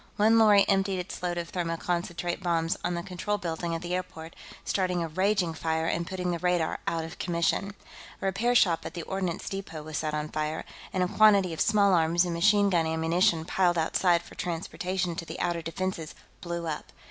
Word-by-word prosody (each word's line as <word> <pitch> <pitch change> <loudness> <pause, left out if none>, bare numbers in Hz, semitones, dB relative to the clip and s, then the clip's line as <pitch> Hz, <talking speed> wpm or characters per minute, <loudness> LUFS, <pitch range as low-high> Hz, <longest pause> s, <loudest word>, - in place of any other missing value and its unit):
One 220 +2 +5
lorry 210 -2 +6
emptied 195 -1 +2
its 180 0 -6
load 175 -1 -2
of 170 -1 -4
thermoconcentrate 175 0 -2
bombs 165 -2 0
on 175 0 -1
the 170 - -3
control 190 +4 -2
building 170 -2 -3
at 165 - -5
the 175 +1 -3
airport, 165 -3 -5 0.3
starting 180 -3 0
a - - -2
raging 185 +1 +1
fire 160 0 -1
and 170 +1 -1
putting 180 -1 -2
the 170 - -2
radar 175 -2 0
out 165 -1 0
of 165 - -10
commission. 175 +4 0 0.4
A - - -5
repair 220 +6 +1
shop 175 -8 +4
at 165 - -7
the 170 - -4
ordnance 185 -2 -3
depot 180 -6 -5
was 155 0 -4
set 155 -1 -2
on 150 0 -3
fire, 155 +1 -3 0.3
and 185 - +1
a - - +1
quantity 200 -3 +5
of 160 - -3
small 200 -2 +4
arms 170 +1 +3
and 175 - -2
machine 200 +3 +4
gun 165 -3 +2
ammunition 160 +1 +2
piled 175 -1 +2
outside 170 +1 +2
for - - -14
transportation 180 +1 -3
to - - -3
the - - -8
outer 175 -1 -1
defenses 165 -1 -4 0.3
blew 170 -1 -4
up. 155 -2 -5
175 Hz, 200 wpm, -28 LUFS, 165-190 Hz, 0.4 s, lorry